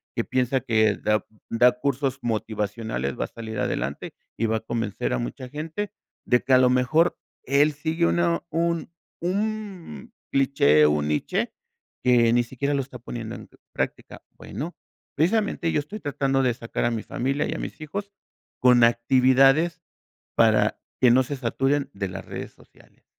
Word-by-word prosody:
que -, -, 0 dB
piensa 130 Hz, +1 st, +1 dB
que 110 Hz, -2 st, +2 dB
da 105 Hz, 0 st, 0 dB, 0.2 s
da 125 Hz, +2 st, +4 dB
cursos 135 Hz, 0 st, -1 dB
motivacionales, 105 Hz, -, -2 dB
va -, -, 0 dB
a -, -, -8 dB
salir 110 Hz, -2 st, -7 dB
adelante 65 Hz, +4 st, -3 dB, 0.2 s
y 115 Hz, -, 0 dB
va 110 Hz, -, +1 dB
a -, -, -3 dB
convencer 110 Hz, -3 st, -2 dB
a 60 Hz, -, 0 dB
mucha -, -, -5 dB
gente 160 Hz, +8 st, -5 dB, 0.3 s
de 125 Hz, -, +3 dB
que, 135 Hz, -, +2 dB
a -, -, +8 dB
lo 125 Hz, -, +5 dB
mejor, 130 Hz, +7 st, +2 dB, 0.3 s
él 145 Hz, +3 st, +3 dB
sigue 160 Hz, +3 st, -1 dB
una 170 Hz, -1 st, +1 dB
un 170 Hz, +1 st, -1 dB, 0.3 s
un 195 Hz, -, -4 dB, 0.2 s
cliché, 105 Hz, -, +4 dB
un 75 Hz, 0 st, +1 dB
niche, 75 Hz, -, -1 dB, 0.5 s
que 120 Hz, -2 st, +4 dB
ni 120 Hz, -, +4 dB
siquiera 135 Hz, +4 st, -2 dB
lo 140 Hz, -, +1 dB
está 125 Hz, -2 st, -11 dB
poniendo 115 Hz, -1 st, -6 dB
en -, -, -11 dB, 0.2 s
práctica, -, -, -4 dB
bueno, 165 Hz, +5 st, -7 dB, 0.4 s
precisamente 175 Hz, 0 st, +1 dB
yo -, -, +1 dB
estoy 205 Hz, +9 st, -8 dB
tratando 135 Hz, -1 st, 0 dB
de 125 Hz, -2 st, +2 dB
sacar 115 Hz, 0 st, -3 dB
a 120 Hz, -, +2 dB
mi 115 Hz, -2 st, -3 dB
familia 135 Hz, +4 st, -1 dB
y -, -, -1 dB
a -, -, -4 dB
mis -, -, -6 dB
hijos 200 Hz, +7 st, -5 dB, 0.5 s
con 125 Hz, -1 st, +6 dB
actividades 130 Hz, +7 st, +4 dB, 0.6 s
para 110 Hz, -2 st, +3 dB, 0.2 s
que 125 Hz, -2 st, +6 dB
no 130 Hz, +2 st, +5 dB
se 140 Hz, +2 st, -4 dB
saturen 135 Hz, +3 st, 0 dB
de 100 Hz, -1 st, -3 dB
las -, -, -7 dB
redes -, -, -7 dB
sociales. -, -, -23 dB
130 Hz, 165 wpm, -25 LUFS, 115-150 Hz, 0.6 s, a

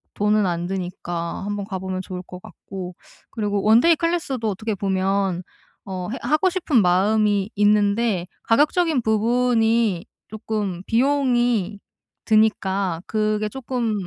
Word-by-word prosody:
돈은 210 Hz, 0 st, +2 dB
안 175 Hz, -1 st, -2 dB
드니까 175 Hz, -2 st, -4 dB
한번 205 Hz, 0 st, -3 dB
가 195 Hz, -2 st, -5 dB
보면 185 Hz, 0 st, -4 dB
좋을 185 Hz, -1 st, -7 dB
것 180 Hz, 0 st, -11 dB
같고 180 Hz, 0 st, -9 dB, 0.4 s
그리고 205 Hz, -2 st, -1 dB
원데이 235 Hz, +11 st, +5 dB
클래스도 320 Hz, -9 st, -1 dB
어떻게 215 Hz, +2 st, -3 dB
보면 190 Hz, -1 st, 0 dB, 0.4 s
어 185 Hz, -2 st, -5 dB
해 260 Hz, -, -4 dB
하고 310 Hz, +5 st, +2 dB
싶은 325 Hz, -, +1 dB
마음이 200 Hz, +2 st, +2 dB
있는데 205 Hz, -1 st, +2 dB, 0.2 s
가격적인 295 Hz, +4 st, +2 dB
부분이 225 Hz, -3 st, +1 dB, 0.2 s
쪼끔 210 Hz, -4 st, -4 dB
비용이 240 Hz, -5 st, +1 dB, 0.5 s
드니까 200 Hz, -5 st, +1 dB
그게 215 Hz, -1 st, 0 dB
쪼끔 240 Hz, -1 st, -3 dB
210 Hz, 265 characters per minute, -22 LUFS, 190-235 Hz, 0.5 s, 원데이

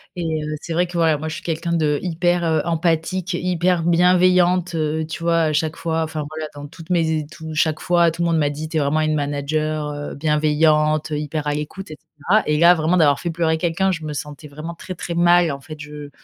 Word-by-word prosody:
Et, 175 Hz, -, -4 dB, 0.2 s
heu, 155 Hz, 0 st, -3 dB
c'est 170 Hz, -, -8 dB
vrai 175 Hz, +1 st, +1 dB
que, 175 Hz, -, -12 dB
voilà, 160 Hz, -2 st, +3 dB
moi 155 Hz, -, -5 dB
je -, -, -5 dB
suis -, -, -8 dB
quelqu'un 170 Hz, +1 st, -2 dB
d'hyper, 170 Hz, +3 st, 0 dB
heu, 160 Hz, -2 st, +2 dB
empathique, 170 Hz, +2 st, -1 dB
hyper 175 Hz, -1 st, 0 dB
bienveillante, 180 Hz, 0 st, +3 dB
heu, 155 Hz, 0 st, -1 dB
tu 165 Hz, +1 st, -6 dB
vois? 165 Hz, 0 st, +2 dB
À 155 Hz, -, +1 dB
chaque 155 Hz, +1 st, 0 dB
fois, 165 Hz, -1 st, -1 dB
enfin, 155 Hz, -1 st, -4 dB
voilà, 155 Hz, -1 st, -4 dB
dans 145 Hz, 0 st, -8 dB
toutes 165 Hz, 0 st, -13 dB
mes 160 Hz, -2 st, +2 dB
é -, -, -8 dB
tout 160 Hz, -1 st, -8 dB
chaque 155 Hz, 0 st, +1 dB
fois, 175 Hz, -2 st, +3 dB
tout 170 Hz, +1 st, -6 dB
le -, -, +1 dB
monde 165 Hz, -1 st, +2 dB
m'a 145 Hz, -1 st, +2 dB
dit: 155 Hz, +2 st, -6 dB
«Tu 160 Hz, -, -2 dB
es 155 Hz, -, +2 dB
vraiment 145 Hz, +3 st, +1 dB
une 155 Hz, 0 st, +1 dB
manager, 150 Hz, +1 st, -2 dB
heu, 145 Hz, 0 st, -6 dB
bienveillante, 155 Hz, 0 st, +2 dB
hyper 150 Hz, 0 st, -3 dB
à 145 Hz, -, +1 dB
l'écoute» 155 Hz, +4 st, -6 dB
et 155 Hz, -, -8 dB
cetera. 180 Hz, +9 st, 0 dB
Et, 150 Hz, 0 st, +2 dB
là, 170 Hz, +1 st, +7 dB
vraiment 160 Hz, +2 st, +1 dB
d'avoir 145 Hz, -4 st, +4 dB
fait 170 Hz, -, -3 dB
pleurer 160 Hz, -1 st, 0 dB
quelqu'un, 175 Hz, +3 st, 0 dB
je 165 Hz, -3 st, -4 dB
me 150 Hz, -, -4 dB
sentais 150 Hz, +1 st, -7 dB
vraiment 155 Hz, +4 st, -7 dB
très, 185 Hz, +2 st, -8 dB
très 170 Hz, -, -5 dB
mal, 175 Hz, -1 st, +4 dB
en 140 Hz, -, -5 dB
fait, 155 Hz, +3 st, -10 dB
je, 150 Hz, -1 st, -9 dB
160 Hz, 235 wpm, -21 LUFS, 150-170 Hz, 0.2 s, là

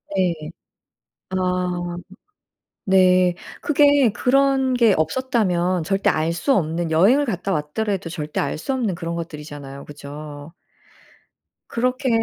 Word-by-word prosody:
네. 185 Hz, -2 st, +2 dB, 1.0 s
아 180 Hz, -1 st, -1 dB, 0.9 s
네. 185 Hz, -2 st, +4 dB, 0.3 s
그게 285 Hz, -4 st, +4 dB
그런 265 Hz, +3 st, +2 dB
게 230 Hz, -4 st, +4 dB
없었다면 180 Hz, -2 st, 0 dB
절대 195 Hz, +4 st, +1 dB
알 160 Hz, +1 st, 0 dB
수 270 Hz, +11 st, +1 dB
없는 165 Hz, -3 st, -1 dB
여행을 210 Hz, -, +4 dB
갔다 195 Hz, -4 st, -3 dB
왔더라도 180 Hz, +4 st, -2 dB
절대 155 Hz, -3 st, -4 dB
알 140 Hz, -, -1 dB
수 265 Hz, -, -3 dB
없는 235 Hz, -7 st, -1 dB
그런 170 Hz, -1 st, -4 dB
것들이잖아요. 145 Hz, -4 st, -8 dB
그죠? 145 Hz, +1 st, -9 dB, 1.2 s
그렇게 255 Hz, +3 st, 0 dB
180 Hz, 225 characters per minute, -22 LUFS, 160-235 Hz, 1.2 s, 네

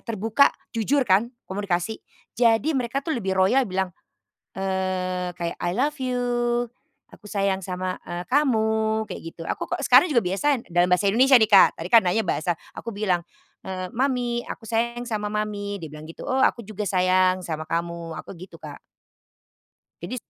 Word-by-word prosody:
terbuka 225 Hz, +5 st, +2 dB, 0.2 s
jujur 265 Hz, +6 st, +2 dB
kan 210 Hz, +7 st, +3 dB, 0.2 s
komunikasi, 195 Hz, +1 st, -2 dB, 0.4 s
jadi 230 Hz, +3 st, +3 dB
mereka 255 Hz, +2 st, -1 dB
tuh 315 Hz, +1 st, -2 dB
lebih 195 Hz, -5 st, -2 dB
royal 195 Hz, +8 st, +3 dB
bilang, 190 Hz, -1 st, -1 dB, 0.7 s
eee, 185 Hz, -1 st, -2 dB
kayak, 170 Hz, -1 st, -4 dB
"I 175 Hz, -, -1 dB
love 295 Hz, +5 st, 0 dB
you, 250 Hz, -1 st, -1 dB, 0.9 s
aku -, -, -17 dB
sayang 195 Hz, -2 st, 0 dB
sama, 185 Hz, 0 st, -3 dB
eee, 175 Hz, 0 st, -4 dB
kamu," 220 Hz, -5 st, +2 dB
kayak -, -, -6 dB
gitu, -, -, -11 dB
aku -, -, -4 dB
kok -, -, -2 dB
sekarang -, -, +7 dB
juga 270 Hz, -8 st, +2 dB
biasa 230 Hz, +8 st, 0 dB
dalam 175 Hz, +1 st, +3 dB
bahasa 195 Hz, +2 st, +3 dB
Indonesia 260 Hz, +5 st, +5 dB
nih 220 Hz, -, +4 dB
Kak, 195 Hz, -, +8 dB
tadi 170 Hz, -, -5 dB
kan 230 Hz, -1 st, +8 dB
nanya 200 Hz, +5 st, +2 dB
bahasa 175 Hz, -2 st, 0 dB, 0.2 s
aku 230 Hz, -, -6 dB
bilang, 190 Hz, -4 st, +1 dB, 0.5 s
eee, 185 Hz, -1 st, -4 dB
"Mami, 245 Hz, -2 st, 0 dB
aku -, -, -7 dB
sayang 235 Hz, +2 st, -1 dB
sama 210 Hz, -3 st, -2 dB
mami," 210 Hz, -1 st, -3 dB
dia -, -, -4 dB
bilang 150 Hz, 0 st, -10 dB
gitu, 165 Hz, -, -10 dB
"Oh, 260 Hz, -, +1 dB
aku -, -, +3 dB
juga 210 Hz, 0 st, -5 dB
sayang 185 Hz, 0 st, +3 dB
sama 155 Hz, -2 st, -4 dB
kamu." 170 Hz, 0 st, -3 dB
Aku -, -, -9 dB
gitu, 185 Hz, -, -11 dB
Kak. -, -, -9 dB, 1.2 s
Jadi -, -, -5 dB
205 Hz, 170 wpm, -24 LUFS, 185-235 Hz, 1.2 s, Kak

